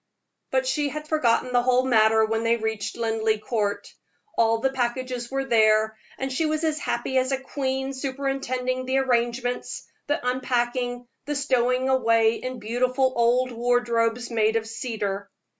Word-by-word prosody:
But - - +1
she 300 -12 0
had 305 +2 -6
forgotten 250 -5 +1
the 245 - +4
whole 255 +1 +2
matter 220 -3 +4
when 225 +1 -1
they 230 0 +2
reached 220 -2 -3
Linleigh 225 -1 0
Court. 210 -1 -2 0.4
All 225 0 +3
the 265 +4 0
packages 250 -1 -2
were 270 0 -2
there, 220 -2 +3 0.2
and 265 0 -3
she 315 +4 +1
was 310 +1 -1
as 310 -1 0
happy 265 -2 0
as 255 +1 -1
a 270 - 0
queen 265 0 -3
superintending 260 -1 -2
the 260 +1 +1
arrangements, 245 -1 -1 0.2
the 290 - +1
unpacking, 245 -1 -1 0.2
the 295 - -2
stowing 255 -2 +1
away 230 -4 +3
in 255 +2 -5
beautiful 255 +4 0
old 245 +2 +2
wardrobes 240 0 0
made 220 -1 +2
of 225 -1 0
cedar. 215 -4 -4
245 Hz, 155 wpm, -25 LUFS, 230-265 Hz, 0.4 s, the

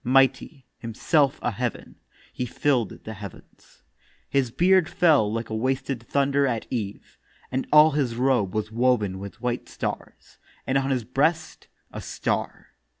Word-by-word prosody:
Mighty, 135 +1 +2
himself 140 +5 +1
a 120 - +1
heav'n, 120 +2 -4 0.4
he 125 - -3
fill'd 125 -4 -1
the 110 - -6
heavens. 100 -3 -13 0.4
His 135 -3 +1
beard 180 +6 +3
fell 150 - +3
like 115 0 -4
a - - -1
wasted 130 +2 -1
thunder 140 +2 +1
at 115 -3 -2
eve, 105 -5 -5 0.3
And 130 +1 -2
all 150 +1 +8
his 135 -5 -1
robe 120 -6 +1
was 110 0 -2
woven 110 -5 +1
with 100 0 -9
white 120 0 -2
stars, - - -6 0.3
And 135 +1 +2
on 135 0 -2
his 130 -3 0
breast 155 +7 -1 0.2
a - - -7
star. - - -3
125 Hz, 150 wpm, -25 LUFS, 115-140 Hz, 0.4 s, all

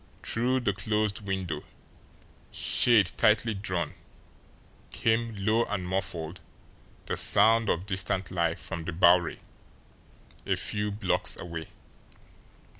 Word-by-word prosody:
Through 125 +3 0
the 105 -5 0
closed 105 +2 -2
window, 95 -4 -3 0.9
shade 105 -7 +3
tightly 110 +1 +3
drawn, 95 -5 -3 1.0
came, 115 +2 0
low 110 +4 +2
and 100 -3 -4
muffled, 90 -2 -3 0.6
the - - -2
sound 115 0 +5
of 85 +3 0
distant 95 -1 -1
life 85 -1 0
from 80 +1 -6
the 85 - -4
Bowery, 85 0 +4 1.0
a - - 0
few 105 0 -1
blocks 100 -2 0
away. 85 -2 -6
95 Hz, 110 wpm, -28 LUFS, 85-110 Hz, 1.0 s, sound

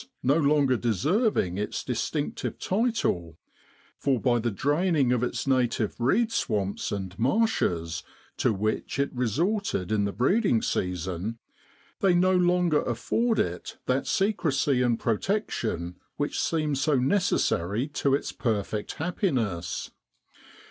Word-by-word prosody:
no 135 +4 +3
longer 145 -4 +3
deserving 120 - +1
its 105 - -3
distinctive 140 +4 -3
title, 185 - -1 0.6
for 135 -3 +1
by 120 -1 +2
the 120 +1 0
draining 145 - +1
of 125 -2 +2
its 125 - -2
native 125 -5 +1
reed 215 - +2
swamps 100 - -1
and 95 -3 -4
marshes, 115 - +1 0.3
to - - +2
which 110 +4 -2
it 140 0 0
resorted 130 - -1
in 105 -2 +2
the 100 - -1
breeding 180 - +2
season, 90 +3 -2 0.6
they 190 -3 +3
no 185 +1 +4
longer 175 -3 +3
afford 220 - 0
it 90 0 -2
that 130 +2 0
secrecy 165 - +1
and 120 -2 +1
protection 110 - -2 0.2
which 145 - -1
seemed 155 -4 0
so 145 +2 +2
necessary 125 - +1
to 140 -2 +1
its - - -3
perfect 105 -3 -2
happiness. 125 - -2
130 Hz, 120 wpm, -27 LUFS, 105-175 Hz, 0.6 s, no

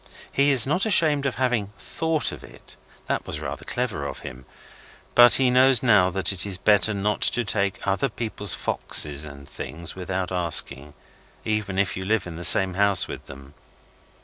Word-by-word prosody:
He 140 +1 +2
is 130 -5 +4
not 180 +10 +1
ashamed 150 -8 +2
of 130 - -4
having 120 -6 -2
THOUGHT 160 -2 -2
of - - -11
it. - - -15 0.3
That - - -3
was - - -4
rather - - -7
clever 120 - -3
of - - -8
him. 65 0 -10 0.7
But 120 0 +8
he 130 -2 +3
knows 130 -1 +4
now 105 -7 +4
that 95 -1 +1
it 95 - -3
is 100 -3 +1
better 105 +2 +2
not 105 +2 -2
to 120 -1 0
take 100 0 -1
other 100 +8 -1
people's 110 -2 -2
foxes 75 0 0
and 70 -2 -12
things 85 +1 -5
without 95 0 -4
asking, 75 -5 0 0.5
even 105 -3 -3
if 100 0 0
you 95 - -5
live 105 0 -1
in 85 -2 -8
the 85 - -8
same 95 +1 +4
house 100 -1 +2
with - - -9
them. 70 +1 -13
100 Hz, 180 wpm, -23 LUFS, 90-120 Hz, 0.7 s, But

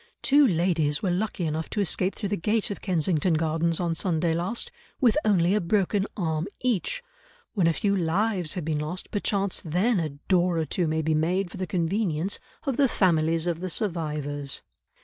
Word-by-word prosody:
"Two 285 0 +6
ladies 165 -5 +1
were 185 - +1
lucky 185 -1 -1
enough 155 +1 -2
to - - -3
escape 190 -1 0
through 205 - -3
the 205 - +1
gate 210 +4 0
of 200 - -6
Kensington 170 -2 +1
Gardens, 165 +1 0
on 170 -2 0
Sunday 165 0 0
last, 180 +8 -2 0.3
with 245 -5 +4
only 185 -3 +3
a 210 - +2
broken 195 +2 +1
arm 160 -2 -1
each. 255 - 0 0.5
When 185 -6 +2
a 165 - +3
few 200 +3 +1
lives 180 0 0
have 175 -5 -3
been 155 -2 0
lost 155 +5 -4
perchance 200 -2 0
then 185 +7 +1
a 160 -2 -1
door 175 +4 +1
or 160 - 0
two 170 +3 0
may 160 +1 0
be 160 +1 +1
made 175 +4 0
for - - -8
the 185 -1 -3
convenience 175 +1 0 0.3
of 270 -3 -1
the 280 - +5
families 165 -4 +2
of 170 -2 -1
the 185 +1 -4
survivors." 150 -8 -2
175 Hz, 190 wpm, -26 LUFS, 160-200 Hz, 0.5 s, Two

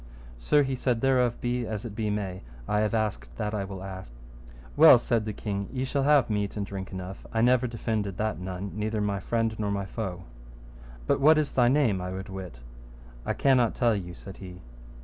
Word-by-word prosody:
Sir, 145 - +3
he 135 -1 -1
said, 125 -2 0
thereof 125 -3 +2
be 120 -1 -1
as 110 0 -4
it 115 - -6
be 110 0 -2
may, 95 -3 -3 0.3
I 105 - +1
have 105 +1 +1
asked - - -2
that 105 +7 -2
I 100 -2 -2
will 95 -1 -7
ask. 95 -5 -8 0.6
Well, - - +9
said 115 -3 0
the 110 - -2
king, 100 -1 -4
ye 130 -1 -2
shall 140 +1 -1
have 140 -2 +4
meat 105 -1 -2
and 100 - -2
drink 95 -1 -6
enough; 95 +1 -7
I 110 - +1
never 125 +1 +4
defended 110 -4 -3
that 110 -2 -1
none, 95 +1 -5
neither 110 +1 -2
my 100 -1 -1
friend 115 +3 0
nor 105 -1 -1
my 100 -1 -2
foe. 95 -4 -5 0.8
But - - +2
what 155 +3 +7
is 155 -2 0
thy 125 -2 +3
name 120 -8 +2
I 90 - -4
would 95 +1 -6
wit? 95 -10 -8 0.7
I - - +1
cannot 125 -4 +3
tell 120 -3 +2
you, 90 -3 -5
said 95 - -11
he. 90 -2 -10
105 Hz, 210 wpm, -27 LUFS, 95-120 Hz, 0.8 s, Well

